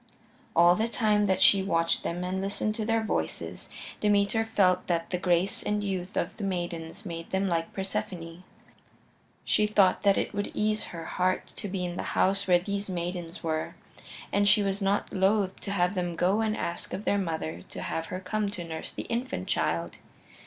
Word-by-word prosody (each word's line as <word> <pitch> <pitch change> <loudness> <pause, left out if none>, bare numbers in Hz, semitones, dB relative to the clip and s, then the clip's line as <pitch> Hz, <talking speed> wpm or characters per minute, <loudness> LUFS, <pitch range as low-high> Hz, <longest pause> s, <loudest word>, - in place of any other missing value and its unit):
All 175 +1 +7
the 220 +5 +1
time 210 -3 +2
that 190 - +3
she 195 - +7
watched 165 -3 +1
them 175 +1 -3
and 185 +1 -2
listened 200 +2 -1
to 215 0 -3
their 225 0 +1
voices 220 - -3 0.3
Demeter 205 +1 +3
felt 185 -5 +2
that 170 -1 -1
the 180 - 0
grace 180 +1 +1
and 210 0 -1
youth 190 -1 -3
of - - -1
the 215 - -5
maidens 175 0 -3
made 165 -2 -6
them 190 +1 0
like 165 -2 -1
Persephone. 180 -3 -4 1.0
She 210 - +3
thought 200 -3 +4
that 200 -1 +4
it - - -1
would 205 0 -2
ease 215 0 +1
her 165 -1 -7
heart 185 +1 0
to - - -5
be 185 -1 -2
in 175 0 -4
the - - -1 0.2
house 195 +1 +3
where 180 -1 +6
these 200 +2 -3
maidens 175 -1 -4
were, 160 -1 -2 0.6
and 200 0 +4
she 210 0 +5
was 195 +1 -1
not 200 +1 0
loath 195 0 +2
to 200 - -4
have 180 -1 +2
them 175 -3 -2
go 190 +6 +2
and 220 -1 0
ask 170 - -4
of 205 - -7
their 205 - +2
mother 160 - -3
to - - -9
have 165 0 -3
her 185 - -4
come 205 +2 -1
to 185 -3 -4
nurse 160 -1 -5
the - - -5
infant 245 +3 -3
child. - - -1
190 Hz, 195 wpm, -28 LUFS, 175-205 Hz, 1.0 s, All